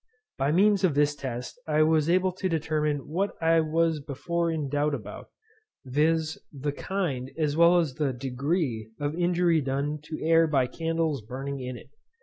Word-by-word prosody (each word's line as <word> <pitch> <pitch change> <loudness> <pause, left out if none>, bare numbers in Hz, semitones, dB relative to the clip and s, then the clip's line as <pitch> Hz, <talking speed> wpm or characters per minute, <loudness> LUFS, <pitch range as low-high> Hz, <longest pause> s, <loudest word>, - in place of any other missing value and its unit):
By 135 +2 +2
means 200 +3 +4
of 170 -7 +3
this 145 0 +3
test 125 - -6
I 155 0 +3
was 155 0 +2
able 185 +1 +3
to 185 +1 -3
determine 150 -3 -1
what 190 +6 -1
I 165 0 +4
was 160 0 +1
before 165 +4 -2
in 155 -3 -2
doubt 145 +1 0
about, 105 -5 -9 0.6
viz. 155 +4 +1
the 145 0 -3
kind 145 -7 -3
as 150 -2 0
well 170 +2 +6
as 160 -6 +1
the 145 -1 0
degree 130 - -2
of 145 0 -1
injury 175 -2 +2
done 140 +2 -2
to 155 0 -6
air 165 0 +4
by 135 -4 +2
candles 165 0 -1
burning 135 +5 -5
in 125 -1 -5
it. 135 - -15
155 Hz, 170 wpm, -27 LUFS, 140-165 Hz, 0.6 s, well